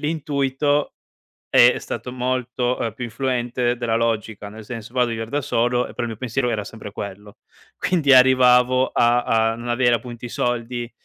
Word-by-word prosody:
l'intuito 145 -2 0
è - - -46 0.6
è - - +6
stato 125 - -6
molto, 125 0 -2
uhm, 115 -3 -2
più 125 - -6
influente 120 0 -1
della 120 -2 -1
logica, 110 -3 -2
nel 110 +1 -11
senso 115 +1 -8
vado 125 -1 +2
a - - -4
viver 115 0 -4
da 145 +2 -2
solo 120 -2 +1
e - - -11
però 120 - -3
il - - -2
mio 110 - -6
pensiero 125 +1 -2
era 105 -3 -2
sempre 105 -1 -10
quello. 100 0 -8 0.4
Quindi 165 -6 0
arrivavo 130 0 +5
a 120 +1 +2
a 115 -1 +1
non 120 +1 -8
avere 120 0 +3
appunto 120 0 -6
i 120 - -6
soldi 120 0 -2
120 Hz, 185 wpm, -21 LUFS, 115-130 Hz, 0.6 s, è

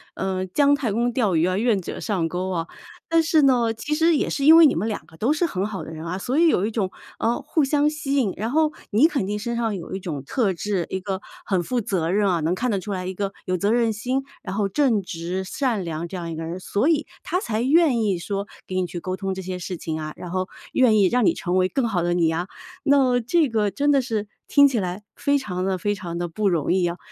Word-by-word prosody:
呃， 190 -1 -2
姜 285 +9 +3
太 255 -6 -2
公 235 +4 +1
钓 215 -8 +1
鱼 160 +2 +3
啊 185 +1 0
愿 215 -3 +2
者 - - -6
上 185 -7 -1
钩 180 +2 -3
啊。 165 -1 -2 0.4
但 330 0 +4
是 315 -1 +3
呢， 245 -5 +3
其 295 +7 -3
实 325 +1 +3
也 - - 0
是 280 -1 -1
因 320 - +9
为 330 -2 +9
你 - - +1
们 200 +7 -1
2 215 - -3
个 160 - -17
都 245 - +2
是 310 +3 -1
很 195 - 0
好 210 -3 -5
的 - - -9
人 160 0 -7
啊， 170 +2 -3
所 255 +8 -2
以 340 - +5
有 195 - +3
一 210 - 0
种， 210 -4 -2 0.3
呃， 230 +2 +1
互 305 +2 0
相 295 +1 +2
吸 300 -2 -3
引， 220 -8 +2
然 225 +4 -2
后 310 0 +3 0.2
你 235 +10 +5
肯 275 - -1
定 210 +2 -2
身 235 +2 -3
上 225 -3 -1
有 185 +1 -6
一 - - -3
种 150 -7 -5
特 205 - 0
质， 185 0 -2
一 190 - -1
个 190 0 -3 0.2
很 185 -3 0
负 245 +6 -1
责 185 -6 -1
任 200 0 +2
啊， 175 - +1
能 160 +3 +1
看 245 +7 -1
得 200 -4 0
出 205 - -6
来 185 -1 -4
一 190 - -4
个 200 0 -3
有 185 0 0
责 200 +4 +1
任 235 -1 +2
心， 250 +6 -1 0.2
然 190 -1 -5
后 205 -1 0
正 230 -2 +2
直 175 +1 -4
善 230 0 -1
良 165 0 -4
这 190 - -8
样 170 -1 -5
一 - - -4
个 165 - -5
人， 170 +3 -5
所 205 +8 0
以 315 -2 +2 0.2
她 360 - -1
才 225 - -1
愿 290 -2 +4
意 195 -4 0
说 200 +3 -3 0.2
给 185 - -5
你 185 - 0
去 175 0 -6
沟 185 +2 -4
通 195 -1 -2
这 190 - -5
些 185 0 -5
事 180 +1 -5
情 160 -1 -4
啊， 155 0 -5
然 180 - -8
后 185 +1 -2 0.3
愿 245 -4 +4
意 195 - +5
让 245 +1 +2
你 - - +4
成 180 0 -1
为 185 - +3
更 245 +4 0
好 180 -5 0
的 175 0 +1
你 170 -2 +2
啊。 175 +3 -2 0.4
那 270 -4 +4
这 295 +5 +2
个 215 -3 +1
真 285 +9 0
的 275 -2 +3
是 220 -4 -2 0.2
听 285 -1 +6
起 265 -4 -1
来 185 +2 -3
非 285 0 +1
常 185 -7 -3
的 190 -1 -1
非 205 +3 0
常 175 -3 -6
的 175 - -1
不 200 +5 -1
容 170 -5 +1
易 185 -1 +2
啊， 170 0 -2
205 Hz, 290 characters per minute, -23 LUFS, 180-255 Hz, 0.4 s, 因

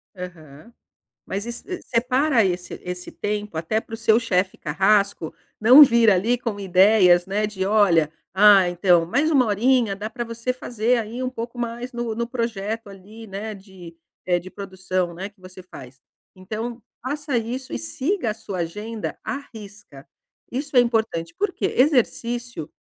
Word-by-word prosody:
Aham. 175 0 -11 0.5
Mas 200 +2 -4
es 235 0 -7 0.2
separa 255 +1 +2
esse 180 -1 -3
esse 180 0 -6
tempo 210 -4 -4
até 165 +7 0
pro 225 - -8
seu 225 0 +3
chefe 190 -5 0
carrasco 195 +2 +1 0.3
não 250 +7 +9
vir 235 -4 +5
ali 210 +6 +2
com 230 -4 -4
ideias, 185 -1 +5
né, 205 +2 -1
de: 190 -3 -3
"Olha, 185 -7 +3 0.2
ah, 195 -2 +6
então, 175 -1 +3
mais 285 - +1
uma 270 -5 +4
horinha 225 0 +2
dá 210 +2 -5
pra 240 +1 -5
você 230 +2 -3
fazer 245 -1 0
aí 230 +3 -4
um 255 - -1
pouco 235 -1 -7
mais 240 +1 -4
no 240 -2 -3
no 235 +1 -2
projeto, 225 -2 -3
ali, 200 +4 -12
né, 205 +2 -6
de 190 -4 -13 0.3
eh, 180 -1 +2
de 180 +2 -11
produção, 185 -2 -3
né, 190 +4 -6
que 205 -1 -33
você 185 0 -12
faz". 135 -7 -13 0.4
Então, 220 +6 -6 0.2
faça 285 +1 -2
isso 245 +3 -4
e - - -2
siga 255 - -2
a - - -4
sua 205 -4 -7
agenda 210 +6 -5
à - - -3 0.2
risca. 205 -10 -12 0.5
Isso 280 +3 -5
é - - +10
importante, 220 -8 -1
por 415 +2 0
quê? - - -2
Exercício 240 - 0
215 Hz, 165 wpm, -23 LUFS, 185-235 Hz, 0.5 s, é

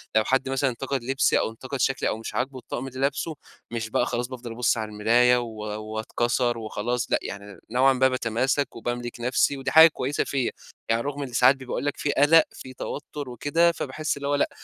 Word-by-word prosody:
لو 110 - +5
حد 135 +3 +1
مثلًا 135 0 +1
انتقد 135 +1 -3
لبسي، 135 +2 +2
أو - - 0
انتقد 130 +4 -6
شكلي، 135 +2 +1
أو 110 - -2
مش 115 - -7
عاجبه 130 0 -2
الطقم 125 +1 -5
اللي 130 0 -8
لابسه، 140 +3 -1 0.4
مش 115 -1 -3
بقى 120 - +1
خلاص 120 0 -2
بافضل 125 -2 -8
أبُص 120 +1 +1
على 110 -1 -3
المرايا، 120 +4 +4
و 120 -1 -3 0.3
واتكَسر 120 +3 -1
وخلاص 115 +2 -3
لأ، - - +3
يعني 100 -2 -8
نوعًا 130 +2 +4
ما 130 +1 +4
باتماسك، 130 +3 0
وباملك 120 +1 -4
نفسي، 125 +3 +1
ودي 135 - -3
حاجة 160 +1 +10
كويسة 145 -2 -2
فيّا. 135 -3 -1 0.4
يعني 115 +1 +2
رغم 145 0 -4
إن 130 -3 -6
ساعات 125 +3 +6
بي 130 - -11
باقول 125 - -3
لك 145 - -1
في 145 - 0
قَلَق، 155 +3 +6
في 130 - -10
توتُّر 145 0 -6
وكده، 160 +8 +2
فباحس 155 -1 -3
إن 140 - -6
هو 145 +1 +1
لأ، 145 - +1
130 Hz, 210 wpm, -25 LUFS, 120-140 Hz, 0.4 s, حاجة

